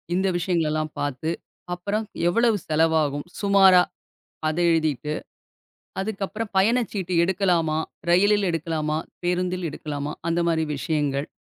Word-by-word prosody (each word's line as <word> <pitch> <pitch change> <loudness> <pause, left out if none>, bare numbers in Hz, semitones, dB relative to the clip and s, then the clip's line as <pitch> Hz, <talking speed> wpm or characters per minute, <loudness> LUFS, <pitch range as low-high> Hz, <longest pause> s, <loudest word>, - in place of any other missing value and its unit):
இந்த 190 +1 +1
விஷயங்களை 170 -2 0
எல்லாம் 155 0 -2
பாத்து, 145 +3 -2 0.4
அப்புறம் 205 +5 -2 0.2
எவ்வளவு 230 +3 +3
செலவாகும் 155 -2 +1 0.2
சுமாரா? 195 -2 +6 0.7
அதை 175 +3 0
எழுதிட்டு, 150 -3 0 0.9
அதுக்கப்புறம் 210 +2 -4
பயணச்சீட்டு 205 -3 +1
எடுக்கலாமா? 170 -4 +1 0.3
ரயிலில் 205 +3 +4
எடுக்கலாமா? 155 -2 -1 0.3
பேருந்தில் 180 0 0
எடுக்கலாமா? 145 -1 -5 0.2
அந்த 170 +1 +1
மாரி 160 -1 +1
விஷயங்கள். 145 0 -1
170 Hz, 105 wpm, -24 LUFS, 155-195 Hz, 0.9 s, சுமாரா